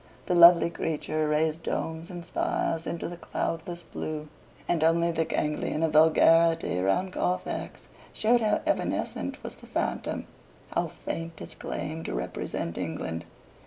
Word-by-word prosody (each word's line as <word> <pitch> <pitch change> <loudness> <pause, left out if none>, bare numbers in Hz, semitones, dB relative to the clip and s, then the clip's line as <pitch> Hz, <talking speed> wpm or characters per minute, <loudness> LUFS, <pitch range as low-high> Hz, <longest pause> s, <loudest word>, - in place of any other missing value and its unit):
The - - 0
lovely 170 -1 +8
creature 155 -1 -1
raised 155 +1 +1
domes 160 +1 -3
and 175 -2 -7
spires 165 -1 -1
into 170 - -3
the 175 +1 -7
cloudless 170 +1 -3
blue, 155 -2 -5 0.4
and 170 -3 +1
only 170 +1 +3
the 165 0 0
ganglion 150 0 -1
of 160 -2 +1
vulgarity 165 - +5
round 140 - +1
Carfax 180 - -2 0.2
showed 235 +2 +3
how 215 - +2
evanescent - - -1
was - - -6
the - - -15
phantom, - - -2 0.5
how - - +1
faint 165 -1 -6
its - - -8
claim 160 +2 -5
to - - -3
represent 85 +7 -3
England. 80 -1 -4
165 Hz, 140 wpm, -28 LUFS, 155-170 Hz, 0.5 s, lovely